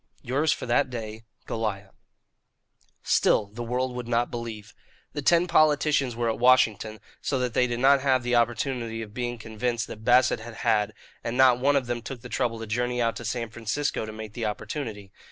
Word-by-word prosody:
"Yours 145 +5 +1
for - - -2
that 130 +3 +2
day, 110 -2 -7 0.2
"GOLIAH." 105 -3 -3 1.1
Still 105 - +3
the 120 - -6
world 125 +2 -1
would 125 -1 -5
not 120 0 +1
believe. 115 -3 -6 0.4
The 145 - -3
ten 170 +4 +4
politicians 150 -6 +3
were 120 0 -1
at 115 - -1
Washington, 115 -3 +3 0.2
so 135 - -1
that 125 -2 -1
they 125 - +3
did 120 -1 -3
not 135 +1 +5
have 130 -2 +2
the 125 0 -1
opportunity 120 0 0
of 105 -1 -11
being 120 0 -3
convinced 115 +1 -2
that 110 -2 -10
Bassett 125 0 +4
had 115 +1 -9
had, 105 -1 +2 0.3
and 115 +1 -3
not 130 -2 +6
one 140 +3 +3
of 135 -2 +2
them 120 0 -3
took 125 0 -7
the - - -9
trouble 120 -3 -1
to 115 - -6
journey 120 +3 -1
out 115 -1 +1
to - - -7
San 115 0 -3
Francisco 115 +4 -2
to - - -6
make 110 -1 -8
the 120 - -5
opportunity. 105 -3 -5
120 Hz, 195 wpm, -26 LUFS, 110-130 Hz, 1.1 s, not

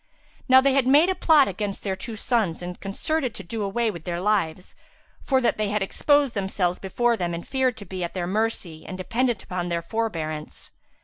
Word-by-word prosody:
Now 260 0 +8
they 275 0 +3
had 270 -2 +2
made 295 +7 +6
a - - +3
plot 315 -6 +5
against 200 +1 -4
their 195 -2 -1
two 220 +4 -7
sons 210 -6 0
and 180 0 -6
concerted 255 +6 -1
to 195 - -7
do 220 +5 -5
away 220 +3 0
their 170 -1 -5
lives, 185 -3 0 0.5
for 265 -2 +2
that 240 - +1
they 210 -1 0
had 210 -1 0
exposed 285 +5 +2
themselves 190 -3 -1
before 235 +5 +1
them 175 -4 -2
and 170 - -7
feared 260 -3 +1
to 205 - -9
be 185 -2 -5
at 170 - -5
their 180 -2 -1
mercy 190 -5 -2
and 185 - -7
dependent 235 +4 -1
upon 175 -1 -3
their 170 -1 -1
forbearance. 165 -7 -4
205 Hz, 200 wpm, -24 LUFS, 180-240 Hz, 0.5 s, Now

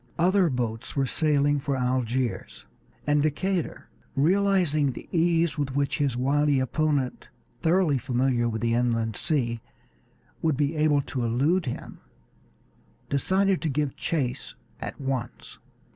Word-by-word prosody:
Other 180 +1 +3
boats 120 -4 -3
were 135 -1 +2
sailing 145 +1 +2
for 140 -1 -2
Algiers, 125 -1 -2 0.4
and 145 0 +3
Decatur, 170 +4 -1 0.3
realizing 165 -3 +2
the - - -10
ease 165 -2 +2
with 135 -2 -2
which 140 -1 0
his 140 -4 0
wily 140 +2 +2
opponent, 140 0 -1 0.3
thoroughly 165 -4 +3
familiar 125 -1 +1
with 110 0 -4
the 115 0 +2
inland 115 -2 0
sea, 120 -8 0 0.8
would 160 -4 +1
be 145 +2 0
able 150 -2 +3
to 130 -3 -3
elude 140 +9 +1
him, 120 - -6 1.1
decided 190 +7 +2
to 160 - -1
give 145 -1 -1
chase 140 -5 -3 0.2
at - - -6
once. 135 -3 -4
140 Hz, 130 wpm, -26 LUFS, 125-155 Hz, 1.1 s, Other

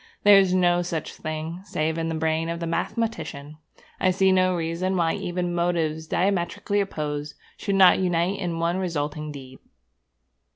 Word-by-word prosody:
There 205 -1 +8
is 190 -2 +2
no 175 -1 +3
such 170 -3 -4
thing, 155 +3 -5
save 160 -3 -2
in 165 0 -1
the 165 - -2
brain 160 +1 0
of 170 0 -3
the 170 - -3
mathematician. 160 -6 -3 0.4
I 185 - +3
see 190 +1 +3
no 185 -1 +3
reason 170 +3 -1
why 165 -2 +2
even 175 0 -3
motives 165 -2 -1
diametrically 200 +3 0
opposite 150 -5 -4 0.2
should 200 -2 -2
not 190 -2 +6
unite 180 +1 0
in 175 -4 -2
one 170 +2 0
resulting 150 -4 -3
deed.' 130 -2 -11
170 Hz, 160 wpm, -25 LUFS, 160-185 Hz, 0.4 s, There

